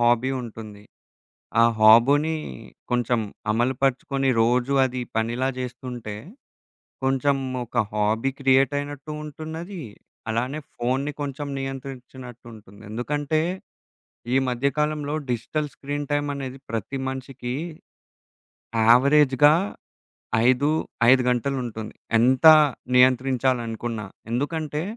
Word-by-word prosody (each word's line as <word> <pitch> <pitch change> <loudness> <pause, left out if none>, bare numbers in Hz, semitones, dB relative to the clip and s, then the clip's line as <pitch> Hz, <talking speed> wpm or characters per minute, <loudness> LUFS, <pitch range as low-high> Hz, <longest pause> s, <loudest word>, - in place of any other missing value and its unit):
Hobby 120 +2 +3
ఉంటుంది. 110 -3 -9 0.8
ఆ - - +7 0.2
హాబునీ 135 +9 +6 0.6
కొంచెం 120 -1 +1 0.3
అమలు 120 +4 +1
పరుచుకొని, 135 0 +1
రోజూ 120 +3 +2
అది 130 -1 -2
పనిలా 120 +3 0
జేస్తుంటే, 125 -3 -6 0.9
కొంచెం 135 +1 +2 0.3
ఒక 120 - -12 0.2
హాబీ 110 +4 +1
క్రియేటయినట్టూ 145 +2 +1
ఉంటున్నదీ, 160 +4 -7 0.5
అలానే 125 +6 -2 0.2
ఫోన్ని 130 +4 -1
కొంచం 145 0 -4
నియంత్రిచ్చినట్టుంటుంది. 125 -5 -9
ఎందుకంటే, 145 +7 -1 0.9
ఈ - - +4
మధ్య 125 +2 +1
కాలంలో 150 -1 -1 0.2
డిజిటల్ 145 +6 -2
స్క్రీన్ 145 0 -5
టైమనేది 140 -2 -2
ప్రతి 115 +4 -3
మనిషికీ 130 -2 -5 1.3
యావరేజ్‌గా 140 +3 +6 0.9
ఐదూ 130 +4 +3 0.4
5 130 0 +6
గంటలుంటుంది. 120 -3 -3 0.3
ఎంతా 130 +6 +7 0.4
నియంత్రించాలనుకున్నా. 125 -3 +1 0.3
ఎందుకంటే, 150 +4 -2
130 Hz, 85 wpm, -24 LUFS, 120-145 Hz, 1.3 s, ఆ